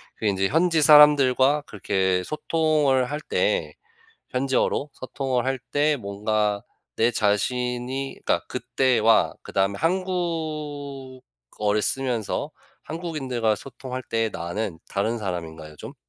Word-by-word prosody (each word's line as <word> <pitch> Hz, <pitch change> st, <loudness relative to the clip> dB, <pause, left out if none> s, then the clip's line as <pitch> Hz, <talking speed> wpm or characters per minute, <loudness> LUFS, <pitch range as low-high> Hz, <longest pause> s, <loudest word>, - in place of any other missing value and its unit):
그게 110 Hz, -, -2 dB
인제 95 Hz, -1 st, +1 dB
현지 165 Hz, -, +2 dB
사람들과 145 Hz, -1 st, +6 dB
그렇게 95 Hz, -2 st, 0 dB
소통을 150 Hz, -, +1 dB
할 150 Hz, -, -2 dB
때 90 Hz, -, 0 dB, 0.6 s
현지어로 135 Hz, +2 st, 0 dB
소통을 130 Hz, 0 st, -3 dB
할 135 Hz, 0 st, 0 dB
때 145 Hz, +1 st, +2 dB
뭔가 105 Hz, -1 st, -1 dB, 0.3 s
내 115 Hz, +2 st, +3 dB
자신이 125 Hz, +5 st, -1 dB
그러니까 -, -, +1 dB
그때와 115 Hz, -4 st, +2 dB
그다음에 95 Hz, +1 st, -1 dB
한국어를 145 Hz, -, -3 dB
쓰면서 125 Hz, -3 st, -1 dB, 0.3 s
한국인들과 135 Hz, -9 st, -2 dB
소통할 130 Hz, +2 st, -7 dB
때 115 Hz, -1 st, -1 dB
나는 85 Hz, +1 st, -4 dB
다른 110 Hz, +4 st, -1 dB
사람인가요 80 Hz, -6 st, -6 dB
좀? -, -, -9 dB
125 Hz, 260 characters per minute, -24 LUFS, 105-145 Hz, 0.6 s, 사람들과